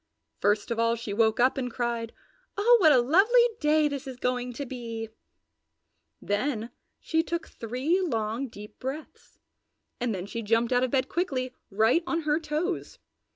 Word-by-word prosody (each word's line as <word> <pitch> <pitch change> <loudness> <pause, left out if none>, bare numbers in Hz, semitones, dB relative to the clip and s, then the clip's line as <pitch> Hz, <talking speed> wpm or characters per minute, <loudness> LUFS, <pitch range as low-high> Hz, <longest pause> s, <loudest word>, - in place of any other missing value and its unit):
First 205 +3 +1
of 230 - -1
all 230 0 +3
she 230 -3 -5
woke 220 +1 +2
up 255 +2 +3
and 250 -1 -2
cried, 235 -1 -2 0.5
"Oh 475 +4 +6
what 315 -3 +7
a 275 - +6
lovely 390 - +5
day 305 0 +3
this 280 -2 -5
is 260 -2 -7
going 250 0 -1
to 280 +4 -5
be!" 230 -3 -6 1.1
Then 225 +3 -2 0.3
she 320 0 +1
took 340 +1 -4
three 260 - -1
long, 230 - -1
deep 210 -2 -12
breaths 270 +4 -7 0.6
and 240 -4 -1
then 180 0 -5
she 230 +3 -5
jumped 230 +3 +1
out 245 0 +3
of 255 - +1
bed 260 0 +1
quickly, 260 -8 -2 0.2
right 220 - +3
on 335 -1 0
her 300 0 +1
toes. 320 +4 -3
250 Hz, 165 wpm, -27 LUFS, 230-305 Hz, 1.1 s, what